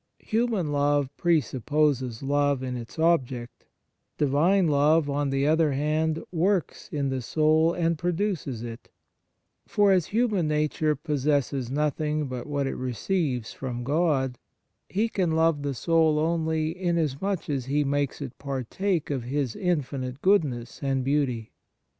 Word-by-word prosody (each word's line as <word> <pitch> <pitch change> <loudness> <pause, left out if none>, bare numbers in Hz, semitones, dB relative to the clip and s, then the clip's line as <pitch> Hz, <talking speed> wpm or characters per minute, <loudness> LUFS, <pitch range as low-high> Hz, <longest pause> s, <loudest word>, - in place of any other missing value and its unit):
Human 220 -8 -1
love 145 -1 +1
presupposes 145 -5 +1
love 140 -1 +1
in 125 -1 -3
its 120 +3 -8
object; 135 -8 0 0.5
Divine 160 +7 +3
love, 150 +1 +3
on 145 0 0
the 135 +1 +1
other 155 -1 +3
hand, 155 +3 0
works 180 +1 0
in 140 -2 -1
the 130 -1 -2
soul 155 +5 +3
and 165 -2 0
produces 175 - -2
it: 115 0 -8 0.8
for 205 -1 +3
as 180 -4 +3
human 215 -7 +1
nature 150 0 +1
possesses 140 -3 -1
nothing 150 +2 0
but 130 -1 -5
what 145 -1 -1
it 135 - -2
receives 130 - -2
from 120 -2 -5
God, 140 -3 +1 0.5
He 215 +4 +1
can 185 -7 0
love 160 -2 +2
the 140 -1 -2
soul 160 +3 +3
only, 160 0 0
inasmuch 175 0 -1
as 135 -5 -2
He 145 +2 +1
makes 145 0 -1
it 130 -2 -8
partake 145 - -2
of 130 -4 -2
His 135 -2 -2
infinite 140 -7 -2
goodness 140 -12 +1
and 135 -2 0
beauty. 130 -5 0
150 Hz, 135 wpm, -26 LUFS, 135-165 Hz, 0.8 s, Divine